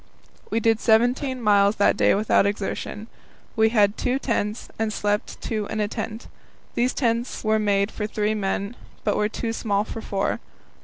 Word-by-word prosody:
We 225 - +1
did 225 0 +2
seventeen 245 +4 +2
miles 200 -1 +4
that 200 - +3
day - - +4
without 205 -1 +3
exertion. 205 +1 -3 0.5
We 220 0 +4
had 210 -2 +3
two 250 +1 0
tents, 225 -4 -2
and 220 -1 0
slept 205 -1 -1
two 215 -2 -2
in 220 - -4
a 210 - +1
tent. 220 +2 -5 0.5
These 250 +2 +1
tents 235 -1 -1
were 215 0 +2
made 200 -1 +1
for 210 - -3
three 210 0 0
men, 200 +1 -2 0.3
but - - +1
were 210 0 +1
too 225 +1 -3
small 205 -3 0
for 225 +1 -7
four. 195 -2 -1
215 Hz, 170 wpm, -24 LUFS, 205-230 Hz, 0.5 s, miles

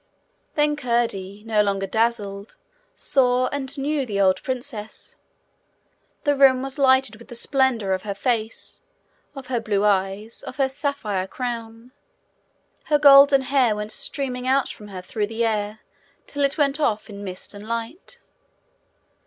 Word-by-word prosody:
Then 295 0 +2
Curdie, 230 -7 -1
no 220 -2 +2
longer 195 -1 0
dazzled, 210 -1 -1 0.4
saw 255 -1 +2
and 280 0 -4
knew 285 +1 0
the 205 -5 -3
old 190 -1 +3
princess. 250 -6 -5 1.1
The 290 -2 +2
room 265 -2 +5
was 270 +1 -5
lighted 260 -4 +3
with 235 - -15
the 240 - -9
splendour 245 -5 +1
of 185 0 0
her 200 -1 -4
face, 225 0 -2 0.5
of 270 -1 -8
her 250 -2 -1
blue 210 -2 0
eyes, 200 +2 0
of - - -8
her 270 -1 +2
sapphire 260 -9 -2
crown. 230 0 -6 0.9
Her 300 - +3
golden 280 -1 +8
hair 260 -5 +2
went 210 +1 -5
streaming 255 0 -3
out 270 0 +2
from 210 - -9
her 185 -3 -8
through 210 +2 -2
the 225 +2 -1
air 215 -1 -2 0.4
till 285 0 -2
it 275 0 +1
went 285 -1 +2
off 215 -8 0
in 205 -2 -9
mist 185 0 -6
and 205 +1 -10
light. 230 - -5
235 Hz, 150 wpm, -23 LUFS, 210-270 Hz, 1.1 s, golden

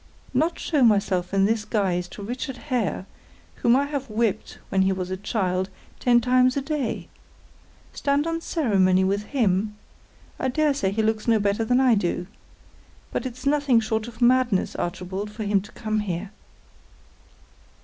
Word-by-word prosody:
"Not 315 +6 +1
show 300 -4 0
myself 200 -6 +3
in 195 0 +3
this 220 +1 +1
guise 190 -5 0
to 200 - -10
Richard 250 +4 -4
Hare 240 - -2 0.5
whom 235 +1 +4
I 280 +2 +2
have 280 -3 -4
whipped 220 -1 -1
when 190 - +2
he 190 0 +3
was 185 -1 -3
a - - 0
child 190 -2 -1 0.3
ten 240 -1 +4
times 255 +2 +3
a - - +1
day! 275 -4 -3 0.9
Stand 285 +1 +1
on 330 0 -2
ceremony 195 - +2
with 200 +2 0
him! 210 -5 0 0.6
I - - 0
dare 295 +3 +2
say 200 -9 0
he 215 +3 0
looks 220 0 0
no 230 -1 +5
better 205 +2 +1
than 245 +3 +2
I 260 -2 +5
do. 180 -3 0 0.9
But - - -2
it's 255 +2 -10
nothing 280 -4 +3
short 220 0 -2
of 240 +1 -4
madness, 245 -5 +3
Archibald, 185 +3 -4
for 215 +1 -6
him 200 -1 +2
to 210 - -13
come 215 -2 -2
here." 195 -1 -4
220 Hz, 165 wpm, -24 LUFS, 195-255 Hz, 0.9 s, no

